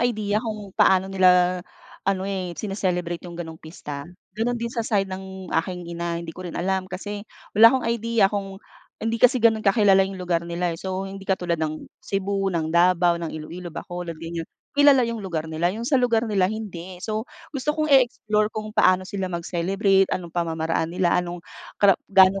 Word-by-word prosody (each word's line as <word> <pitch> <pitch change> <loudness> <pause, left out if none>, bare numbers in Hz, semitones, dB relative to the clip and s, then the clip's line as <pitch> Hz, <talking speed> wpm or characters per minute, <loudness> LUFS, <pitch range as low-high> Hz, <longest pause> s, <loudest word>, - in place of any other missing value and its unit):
idea 215 -3 0
kung 215 -4 -6
paano 190 0 +4
nila 180 -1 +4 0.5
ano, 190 -1 +1
eh, 190 -2 -3
sine-celebrate 180 -4 -2
yung 170 - -9
ganong 160 -2 -7
pista. 150 -3 -7 0.3
Ganon 240 +3 0
din 235 0 -4
sa 235 - -2
side 200 -3 +1
ng 190 0 -8
aking 175 +2 -1
ina, 170 0 -3
hindi 165 -1 -7
ko 185 - -8
rin 175 - -6
alam. 185 +1 -1
Kasi 205 +2 -5 0.3
wala 230 +2 +9
akong 260 -3 0
idea 230 -2 +2
kung 195 -1 -4 0.4
hindi 225 +1 -2
kasi 255 +1 +6
ganun 220 -1 +3
kakilala 195 -2 +5
yung 190 0 -4
lugar 175 -2 0
nila. 170 0 -2
So 190 0 -3
hindi 195 0 -8
katulad 175 -3 0
ng 155 0 -3 0.2
Cebu, 195 0 -1
ng 160 -3 -2
Davao, 175 0 +4
ng 165 - -3
Ilo-ilo, 170 +3 -7
Bacolod 175 0 -6
ganyan 165 0 -6 0.2
kilala 285 -3 +6
yung 230 -2 -3
lugar 165 -4 -3
nila. 165 +2 +1
Yung 225 +4 -5
sa 275 - +1
lugar 235 -2 +2
nila 195 -3 +2
hindi. 190 -5 -6
So 215 0 -2 0.3
gusto 275 +3 0
kong 310 - +1
i-explore 215 -5 +3
kung 215 0 -6
paano 185 -2 +4
sila 190 -2 -3
mag-celebrate, 190 +3 +1
anong 175 -2 -3
pamamaraan 165 -1 -1
nila, 175 -2 +2
anong 175 0 -1 0.4
kara 200 -1 +6 0.2
gano 190 0 +6
190 Hz, 180 wpm, -24 LUFS, 175-215 Hz, 0.5 s, wala